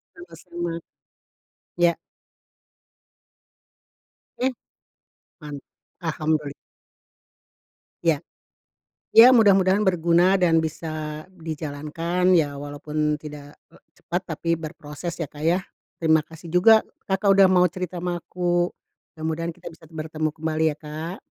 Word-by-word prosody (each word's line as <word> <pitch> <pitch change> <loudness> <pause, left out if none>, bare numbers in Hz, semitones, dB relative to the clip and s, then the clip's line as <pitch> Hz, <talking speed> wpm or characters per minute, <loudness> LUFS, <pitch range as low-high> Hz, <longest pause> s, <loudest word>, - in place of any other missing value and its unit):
Sama-sama, 170 0 -6 1.0
ya. 175 -1 +4 2.5
Oke. 260 +2 +1 0.9
Man 150 -1 -8 0.5
alhamduli 155 -3 -1 1.5
Ya. 160 -4 +2 0.9
Ya 250 +3 +9
mudah-mudahan 195 -3 +5
berguna 180 0 +3
dan 165 -3 +3
bisa 155 -1 -5
dijalankan 165 +2 -2
ya, 150 -4 +2
walaupun 150 +1 -2
tidak, 150 -1 -10
eee, - - -21 0.2
cepat 175 +2 -2
tapi 165 +2 0
berproses 155 +1 -7
ya, 165 - -2
Kak, 145 +1 -12
ya. 170 +3 +3 0.4
Terima 160 -1 +3
kasih 160 +2 -13
juga 215 +6 +6 0.3
Kakak 195 +1 +2
udah 195 -1 +7
mau 180 -1 +5
cerita 180 -1 -5
sama 175 -1 -3
aku, 175 0 0 0.5
mudah-mudahan 160 +1 -2
kita 165 - -15
bisa 165 0 -17
bertemu 155 -1 -3
kembali 160 0 -2
ya, - - -28
Kak. 155 +4 -6
165 Hz, 105 wpm, -24 LUFS, 155-180 Hz, 2.5 s, Ya